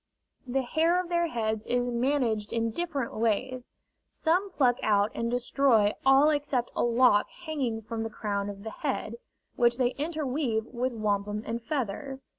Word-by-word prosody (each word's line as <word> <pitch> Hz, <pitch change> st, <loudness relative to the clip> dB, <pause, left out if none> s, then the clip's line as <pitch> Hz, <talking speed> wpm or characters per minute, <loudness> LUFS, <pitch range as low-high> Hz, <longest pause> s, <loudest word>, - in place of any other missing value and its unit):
The 265 Hz, +2 st, 0 dB
hair 325 Hz, +7 st, +2 dB
of 365 Hz, -1 st, -4 dB
their 345 Hz, -1 st, +1 dB
heads 220 Hz, -5 st, -2 dB
is 245 Hz, 0 st, +1 dB
managed 240 Hz, -3 st, 0 dB
in 230 Hz, -1 st, 0 dB
different 285 Hz, -4 st, -3 dB
ways: 240 Hz, +3 st, -1 dB, 0.4 s
some 360 Hz, +5 st, 0 dB
pluck 250 Hz, -8 st, +2 dB
out 205 Hz, 0 st, +2 dB
and 230 Hz, 0 st, -2 dB
destroy 245 Hz, -3 st, +3 dB
all 270 Hz, +3 st, +6 dB
except 285 Hz, -5 st, -1 dB
a -, -, 0 dB
lock 240 Hz, -3 st, +4 dB, 0.2 s
hanging 255 Hz, -8 st, -2 dB
from 225 Hz, +1 st, -4 dB
the 225 Hz, -, -3 dB
crown 205 Hz, -2 st, -3 dB
of 200 Hz, 0 st, -8 dB
the 220 Hz, -, -5 dB
head, 235 Hz, -5 st, -3 dB, 0.4 s
which 240 Hz, 0 st, +3 dB
they 250 Hz, -2 st, +2 dB
interweave 285 Hz, -7 st, -1 dB
with 250 Hz, +2 st, -2 dB
wampum 210 Hz, -1 st, -1 dB
and 230 Hz, +1 st, -3 dB
feathers. 270 Hz, 0 st, -4 dB
245 Hz, 160 wpm, -28 LUFS, 220-280 Hz, 0.4 s, all